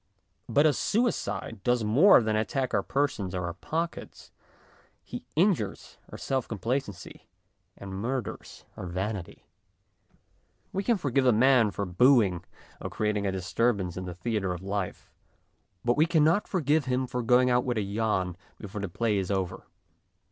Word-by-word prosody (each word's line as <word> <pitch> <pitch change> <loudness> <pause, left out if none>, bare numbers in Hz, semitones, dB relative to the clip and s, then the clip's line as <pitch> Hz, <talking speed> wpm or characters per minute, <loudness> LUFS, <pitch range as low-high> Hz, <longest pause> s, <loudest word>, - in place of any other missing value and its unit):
But 140 +6 +4
a 155 - +5
suicide 120 - -1
does 120 0 +2
more 125 - +6
than 110 0 0
attack 130 +4 -1
our 100 - +3
persons 105 -7 -1
or 90 -1 -2
our 85 - -4
pockets; 165 - -5 0.7
he - - -8
injures 160 - 0
our - - -7
self 130 -2 -2
complacency 115 -3 -4 0.5
and 100 -1 -8
murders 120 +6 -5
our 90 - -6
vanity. 95 +1 -5 1.3
We 195 - -1
can 235 +1 +2
forgive 135 -5 +1
a - - +7
man 120 0 +4
for 100 +1 -3
boo 125 +9 +5
ing 90 -3 -3 0.4
or - - -4
creating 105 -1 -1
a - - 0
disturbance 95 0 0
in 95 - -5
the 90 -1 -6
theatre 95 -1 -2
of 90 - -9
life, 100 -1 -4 0.7
but 120 +2 +2
we 155 +2 +4
cannot 165 +4 +3
forgive 155 -5 +1
him 130 0 0
for 125 0 -3
going 125 +2 +4
out 125 0 +3
with 125 -2 -2
a - - +1
yawn 100 -3 -1 0.2
before 105 0 -7
the 100 - -3
play 105 +2 0
is 95 - -3
over. 95 -2 -3
110 Hz, 160 wpm, -28 LUFS, 95-135 Hz, 1.3 s, a